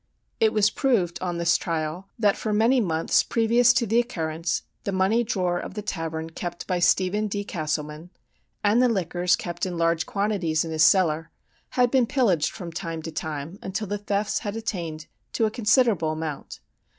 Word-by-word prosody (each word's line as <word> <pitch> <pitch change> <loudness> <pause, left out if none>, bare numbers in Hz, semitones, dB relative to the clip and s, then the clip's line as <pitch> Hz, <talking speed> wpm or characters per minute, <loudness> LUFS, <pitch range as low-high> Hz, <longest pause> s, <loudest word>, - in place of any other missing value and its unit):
"It 220 -1 +4
was 210 -1 +3
proved, 210 -11 0
on 175 -2 -2
this 170 0 +3
trial, 165 +2 -3
that 210 -4 +3
for 215 - -3
many 225 +5 +3
months 165 -5 +2
previous 235 +1 +3
to 240 - +1
the 225 +2 +2
occurrence 165 -8 -2 0.2
the 200 - -2
money 195 +5 +2
drawer 180 -5 -1
of - - -7
the 210 - -4
tavern 165 -4 -4
kept 175 +1 -6
by 180 -2 -1
Stephen 190 +4 +2
D. 205 0 -3
Castleman, 155 -2 -4 0.5
and 210 +4 +4
the 250 - +4
liquors 180 -3 +1
kept 175 -1 -6
in 180 -2 -1
large 165 0 +1
quantities 195 -6 0
in 165 - -5
his 160 -1 0
cellar, 165 -3 +3 0.5
had 245 -1 +4
been 255 -3 +3
pillaged 205 - +2
from 175 -5 -8
time 165 -1 -5
to 165 - -5
time, 155 +3 -5
until 195 +3 -3
the 205 +1 -3
thefts 205 0 -1
had 205 0 -5
attained 170 -9 -4 0.3
to 225 - +2
a 215 - 0
considerable 210 -6 +2
amount. 155 -2 -6
185 Hz, 180 wpm, -25 LUFS, 165-215 Hz, 0.5 s, It